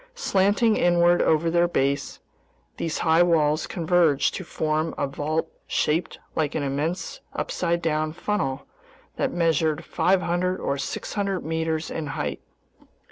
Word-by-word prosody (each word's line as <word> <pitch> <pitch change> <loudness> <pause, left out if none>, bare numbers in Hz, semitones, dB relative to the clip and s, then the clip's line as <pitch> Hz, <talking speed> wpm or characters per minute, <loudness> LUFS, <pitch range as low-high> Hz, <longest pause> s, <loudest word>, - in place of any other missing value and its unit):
Slanting 210 - +2
inward 175 0 +4
over 160 +1 +2
their 175 0 +3
base, 140 -4 -1 0.6
these 165 - -2
high 160 +1 +5
walls 155 -3 +2
converged 165 -5 +2
to 185 - -5
form 155 -1 -1
a - - 0
vault 155 +4 -2 0.2
shaped 160 +4 0 0.2
like 150 -2 0
an 145 - 0
immense 150 +7 -3
upside 170 -1 -1
down 155 -1 0
funnel 160 -6 -2 0.5
that - - 0
measured 160 -2 +1
500 180 0 +1
or 140 0 -2
600 195 +6 -3
meters 160 0 -2
in 155 -2 -4
height. - - -3
165 Hz, 130 wpm, -25 LUFS, 155-175 Hz, 0.6 s, high